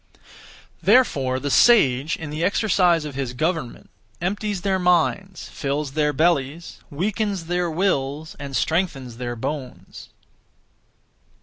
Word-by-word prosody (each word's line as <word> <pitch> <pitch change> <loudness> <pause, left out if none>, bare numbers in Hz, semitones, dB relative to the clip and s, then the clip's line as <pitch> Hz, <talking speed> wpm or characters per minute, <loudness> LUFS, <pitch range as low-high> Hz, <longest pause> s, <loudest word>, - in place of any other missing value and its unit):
Therefore 140 - +3
the 145 +1 -3
sage, 150 - +4
in 160 -2 -7
the 155 +2 -3
exercise 180 -4 +2
of 150 - -6
his 130 -2 -4
government, 155 -1 -3 0.3
empties 205 +2 -2
their 190 0 0
minds, 180 +2 +1
fills 140 0 -3
their 150 +1 +1
bellies, 155 +1 0
weakens 200 +3 -2
their 175 +1 -1
wills, 155 -4 -1
and 140 -1 -6
strengthens 140 -9 -1
their 120 -1 -4
bones. 130 +2 -7
160 Hz, 115 wpm, -22 LUFS, 135-185 Hz, 0.3 s, sage